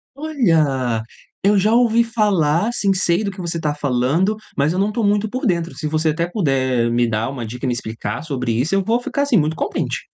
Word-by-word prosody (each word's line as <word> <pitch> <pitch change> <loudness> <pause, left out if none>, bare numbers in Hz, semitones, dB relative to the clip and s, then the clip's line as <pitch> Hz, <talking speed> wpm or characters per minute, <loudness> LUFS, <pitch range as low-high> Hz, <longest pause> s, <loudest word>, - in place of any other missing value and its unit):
Olha! 155 - +1 0.4
Eu 205 +1 +4
já 210 +3 +3
ouvi 235 -1 +4
falar, 205 -5 +1
sim, 200 -5 +1
sei 180 +1 +1
do 200 - -2
que 185 - -9
você 170 -1 -3
tá 150 -2 -1
falando, 145 - 0 0.2
mas 145 +4 +1
eu 185 - -1
não 200 +2 +1
tô 225 +2 -2
muito 205 +1 +2
por 255 +5 -4
dentro. 170 -5 0
Se 155 - -4
você 155 +1 0
até 165 +2 -1
puder 130 - 0
me 120 0 +2
dar 110 +2 -1
uma 125 -4 -5
dica 125 +4 -6
e - - 0
me 125 - +1
explicar 110 -2 -5
sobre 130 -6 -2
isso 130 +11 0
eu 195 - +2
vou 230 +4 +1
ficar 280 +3 -2
assim 270 -6 +2
muito 155 +1 +1
contente. - - -2
165 Hz, 225 wpm, -20 LUFS, 130-210 Hz, 0.4 s, Eu